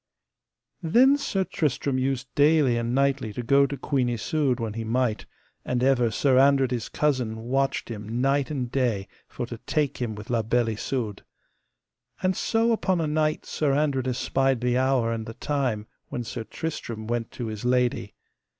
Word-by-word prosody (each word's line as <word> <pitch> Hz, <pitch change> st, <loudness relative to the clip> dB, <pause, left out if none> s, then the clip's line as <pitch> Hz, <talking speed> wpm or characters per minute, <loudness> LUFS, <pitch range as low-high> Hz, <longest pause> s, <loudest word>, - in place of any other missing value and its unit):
Then 245 Hz, -, +5 dB
Sir 200 Hz, -9 st, -1 dB
Tristram 140 Hz, -5 st, -1 dB
used 130 Hz, -1 st, -2 dB
daily 145 Hz, -4 st, +4 dB
and 120 Hz, +1 st, -1 dB
nightly 135 Hz, -4 st, +1 dB
to 125 Hz, -, -4 dB
go 140 Hz, +3 st, +4 dB
to 140 Hz, -, -5 dB
Queen 130 Hz, -4 st, 0 dB
Isoud 125 Hz, +3 st, 0 dB
when 115 Hz, -2 st, -3 dB
he 115 Hz, +1 st, -4 dB
might, 115 Hz, 0 st, -1 dB, 0.4 s
and 125 Hz, 0 st, -1 dB
ever 130 Hz, -3 st, +3 dB
Sir 130 Hz, +4 st, +3 dB
Andred 135 Hz, -1 st, +4 dB
his 120 Hz, -3 st, -2 dB
cousin 125 Hz, -7 st, 0 dB
watched 135 Hz, +3 st, 0 dB
him 110 Hz, +1 st, -5 dB
night 135 Hz, +1 st, +1 dB
and 130 Hz, -5 st, -3 dB
day 115 Hz, -7 st, 0 dB, 0.2 s
for -, -, -5 dB
to 120 Hz, -1 st, -8 dB
take 150 Hz, -3 st, 0 dB
him 115 Hz, -3 st, -2 dB
with 105 Hz, +2 st, -8 dB
La 115 Hz, -2 st, +2 dB
Beale 115 Hz, +1 st, +1 dB
Isoud. 110 Hz, -1 st, -3 dB, 1.0 s
And 185 Hz, 0 st, +2 dB
so 230 Hz, +4 st, +1 dB
upon 190 Hz, -5 st, +1 dB
a 165 Hz, -, 0 dB
night 155 Hz, 0 st, 0 dB
Sir 145 Hz, -3 st, 0 dB
Andred 140 Hz, -3 st, +1 dB
espied 130 Hz, 0 st, +1 dB
the 125 Hz, 0 st, +1 dB
hour 130 Hz, -3 st, +2 dB
and 110 Hz, -1 st, -4 dB
the 115 Hz, -, -7 dB
time 130 Hz, -8 st, -1 dB, 0.2 s
when 120 Hz, -, -3 dB
Sir 115 Hz, 0 st, -6 dB
Tristram 115 Hz, -9 st, -5 dB
went 115 Hz, 0 st, -2 dB
to 120 Hz, -, -5 dB
his 110 Hz, -1 st, -5 dB
lady. 125 Hz, 0 st, 0 dB
130 Hz, 175 wpm, -26 LUFS, 115-140 Hz, 1.0 s, Then